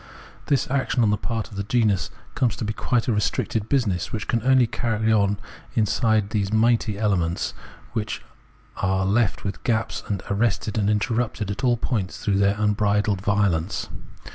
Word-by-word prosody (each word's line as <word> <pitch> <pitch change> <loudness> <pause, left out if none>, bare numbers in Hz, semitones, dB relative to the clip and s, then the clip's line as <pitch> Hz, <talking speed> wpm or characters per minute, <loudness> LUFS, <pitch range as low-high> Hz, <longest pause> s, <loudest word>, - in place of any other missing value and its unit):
This 140 -3 +2
action 135 -3 +1
on 105 - +3
the - - +3
part 115 0 -3
of 100 - -9
the 100 - -1
genus 105 -6 +1 0.2
comes 120 -3 +1
to - - -4
be 105 - -2
quite 120 +2 0
a 120 - +2
restricted 105 +1 -1
business, 105 - 0
which 110 -2 -2
it - - -15
can 115 - +1
only 130 +1 +5
carry 110 -1 0
on 100 -1 +2 0.4
inside 110 -1 +2
those 100 -2 0
mighty 110 -2 +2
elements, 90 -5 0
and - - -18
which 105 -1 -3 0.6
is 95 0 +1
left 105 +2 +1
with 95 -7 -4
gaps 115 -2 0
and 100 -3 -2
arrested 105 0 0
and 100 -1 +2
interrupted 110 0 0
at 100 - -5
all 120 -2 +3
points 105 -6 -2
through 100 -2 0
their 100 0 +3
unbridled 105 -1 +1
violence. 100 -3 0
105 Hz, 175 wpm, -24 LUFS, 100-115 Hz, 0.6 s, only